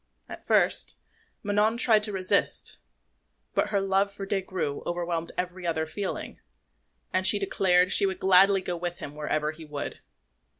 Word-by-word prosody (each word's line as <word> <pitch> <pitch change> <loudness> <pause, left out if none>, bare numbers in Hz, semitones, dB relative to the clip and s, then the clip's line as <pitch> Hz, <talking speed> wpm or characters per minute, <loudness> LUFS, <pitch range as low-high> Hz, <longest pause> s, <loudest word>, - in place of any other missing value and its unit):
At - - -11
first, - - +2 0.5
Manon 210 +2 +1
tried 225 -3 +4
to 210 - -5
resist; 190 -2 +1 0.7
but - - +1
her 200 - +1
love 195 +1 +1
for 200 -1 -7
Des 195 0 -1
Grieux 165 -7 -4
overwhelmed 170 -1 -3
every 180 0 -4
other 160 -1 -1
feeling, 190 +5 -5 0.7
and 185 +1 +3
she 205 - +8
declared 185 -2 +2
she 200 - +5
would 190 - -4
gladly 190 +1 +5
go 180 -1 -4
with 175 0 -5
him 145 - -8
wherever 150 0 -2
he 160 +1 -12
would. 150 -2 -6
185 Hz, 160 wpm, -26 LUFS, 170-195 Hz, 0.7 s, she